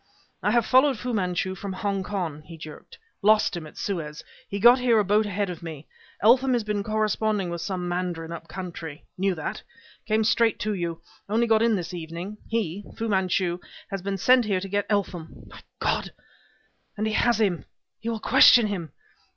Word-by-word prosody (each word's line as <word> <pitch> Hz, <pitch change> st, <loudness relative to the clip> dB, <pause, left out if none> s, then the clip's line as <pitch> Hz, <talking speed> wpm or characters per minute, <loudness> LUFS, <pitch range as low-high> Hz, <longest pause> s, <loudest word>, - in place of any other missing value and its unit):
"I -, -, +1 dB
have 235 Hz, +1 st, +3 dB
followed 260 Hz, 0 st, +4 dB
Fu 245 Hz, +3 st, -4 dB
Manchu 185 Hz, -2 st, -1 dB
from 195 Hz, +1 st, -6 dB
Hongkong," 190 Hz, -5 st, -3 dB
he 165 Hz, -1 st, -10 dB
jerked. 155 Hz, -1 st, -11 dB, 0.2 s
"Lost 215 Hz, -1 st, +4 dB
him 165 Hz, -3 st, -6 dB
at -, -, -15 dB
Suez. 155 Hz, -6 st, -4 dB, 0.3 s
He 200 Hz, -, -3 dB
got 240 Hz, +4 st, +7 dB
here 245 Hz, -2 st, +3 dB
a 210 Hz, -, +3 dB
boat 210 Hz, +2 st, +3 dB
ahead 200 Hz, -1 st, -1 dB
of 175 Hz, -, -8 dB
me. 160 Hz, -3 st, -8 dB, 0.4 s
Eltham 255 Hz, +4 st, +5 dB
has 240 Hz, -2 st, +1 dB
been 210 Hz, -1 st, -1 dB
corresponding 215 Hz, -2 st, 0 dB
with 170 Hz, -1 st, -4 dB
some 180 Hz, 0 st, -3 dB
mandarin 175 Hz, -2 st, -3 dB
up 165 Hz, 0 st, -7 dB
country. 170 Hz, -4 st, -7 dB
Knew 190 Hz, 0 st, 0 dB
that. 160 Hz, -, -4 dB, 0.5 s
Came 220 Hz, 0 st, +2 dB
straight 230 Hz, 0 st, +3 dB
to 215 Hz, 0 st, 0 dB
you. 170 Hz, -3 st, -3 dB, 0.3 s
Only 225 Hz, +3 st, +2 dB
got 220 Hz, -1 st, +3 dB
in 230 Hz, -1 st, +3 dB
this 175 Hz, -1 st, -4 dB
evening. 175 Hz, +5 st, -6 dB
He 205 Hz, -4 st, -2 dB
Fu 225 Hz, -, -2 dB
Manchu 185 Hz, -2 st, +1 dB, 0.3 s
has 195 Hz, -1 st, -3 dB
been 195 Hz, +1 st, -2 dB
sent 250 Hz, +5 st, +5 dB
here 200 Hz, -3 st, +1 dB
to 195 Hz, -, -6 dB
get 205 Hz, +1 st, -1 dB
Eltham. 190 Hz, -6 st, -2 dB
My -, -, -13 dB, 0.2 s
God! -, -, 0 dB, 0.9 s
and 215 Hz, -, -1 dB
he 220 Hz, -, -1 dB
has 235 Hz, 0 st, +2 dB
him! 195 Hz, -6 st, +1 dB, 0.3 s
He 225 Hz, -, -4 dB
will 225 Hz, -1 st, -2 dB
question 235 Hz, +2 st, +7 dB
him! 180 Hz, -8 st, -4 dB
200 Hz, 190 wpm, -25 LUFS, 175-220 Hz, 0.9 s, got